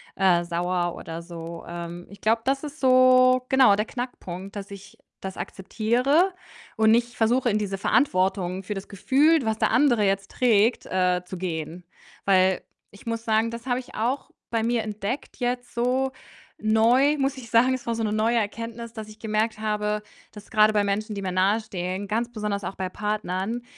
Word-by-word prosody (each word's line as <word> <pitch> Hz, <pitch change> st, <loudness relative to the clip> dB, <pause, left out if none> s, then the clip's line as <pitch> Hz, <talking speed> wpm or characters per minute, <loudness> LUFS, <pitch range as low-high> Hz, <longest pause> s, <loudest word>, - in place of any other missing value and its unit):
äh, 180 Hz, -3 st, +3 dB
sauer 175 Hz, 0 st, -1 dB
oder 165 Hz, +1 st, -7 dB
so. 170 Hz, -1 st, -8 dB
Ähm, 170 Hz, 0 st, -7 dB
ich 200 Hz, -, -14 dB
glaube, 225 Hz, +1 st, +2 dB
das 270 Hz, +2 st, 0 dB
ist 295 Hz, +1 st, -7 dB
so, 255 Hz, -1 st, +5 dB
genau, 260 Hz, -6 st, +6 dB
der 210 Hz, +1 st, -1 dB
Knackpunkt, 200 Hz, -7 st, -6 dB
dass 200 Hz, 0 st, -7 dB
ich 200 Hz, 0 st, -11 dB, 0.2 s
das 190 Hz, 0 st, -6 dB
akzeptiere 250 Hz, -, +1 dB, 0.4 s
und 220 Hz, 0 st, +5 dB
nicht 240 Hz, +1 st, +2 dB
versuche, 240 Hz, +2 st, +2 dB
in 210 Hz, -, +1 dB
diese 200 Hz, -2 st, -2 dB
Verantwortung 190 Hz, -6 st, +1 dB
für 205 Hz, +3 st, -4 dB
das 195 Hz, 0 st, -6 dB
Gefühl, 285 Hz, -, +3 dB
was 220 Hz, -1 st, -1 dB
der -, -, +1 dB
andere 240 Hz, -8 st, +4 dB
jetzt 195 Hz, 0 st, -1 dB
trägt, 230 Hz, -1 st, +2 dB
äh, 180 Hz, -1 st, +1 dB
zu 185 Hz, +1 st, -7 dB
gehen. 170 Hz, -1 st, -4 dB, 0.4 s
Weil 190 Hz, -1 st, +3 dB, 0.3 s
ich 200 Hz, +3 st, -16 dB
muss 230 Hz, 0 st, -3 dB
sagen: 220 Hz, +1 st, +2 dB
„Das 235 Hz, +1 st, -8 dB
habe 250 Hz, -1 st, 0 dB
ich 255 Hz, -, -11 dB
auch 245 Hz, +6 st, -1 dB, 0.2 s
bei 230 Hz, -1 st, +1 dB
mir 230 Hz, 0 st, 0 dB
entdeckt 215 Hz, +5 st, -5 dB
jetzt 245 Hz, 0 st, -3 dB
so 255 Hz, +3 st, +1 dB, 0.5 s
neu“, 235 Hz, +7 st, +3 dB
muss 275 Hz, 0 st, 0 dB
ich 240 Hz, -3 st, -10 dB
sagen. 240 Hz, +3 st, +4 dB
Es 255 Hz, -2 st, -5 dB
war 235 Hz, -, 0 dB
so 225 Hz, -, -2 dB
'ne 210 Hz, -1 st, 0 dB
neue 225 Hz, +2 st, +2 dB
Erkenntnis, 230 Hz, +2 st, -4 dB
dass 220 Hz, -2 st, -7 dB
ich 215 Hz, -, -13 dB
gemerkt 220 Hz, 0 st, -1 dB
habe, 210 Hz, -1 st, -1 dB, 0.3 s
dass 210 Hz, -1 st, -13 dB
grade 215 Hz, -2 st, +5 dB
bei 210 Hz, -1 st, +3 dB
Menschen, 210 Hz, +2 st, -2 dB
die 200 Hz, -, -4 dB
mir 185 Hz, -, -2 dB
nahestehen, 190 Hz, -1 st, -1 dB
ganz 230 Hz, +3 st, -1 dB
besonders 210 Hz, -3 st, -3 dB
auch 190 Hz, -, -5 dB
bei 190 Hz, -, -3 dB
Partnern, 210 Hz, +2 st, -3 dB
215 Hz, 185 wpm, -25 LUFS, 195-240 Hz, 0.5 s, genau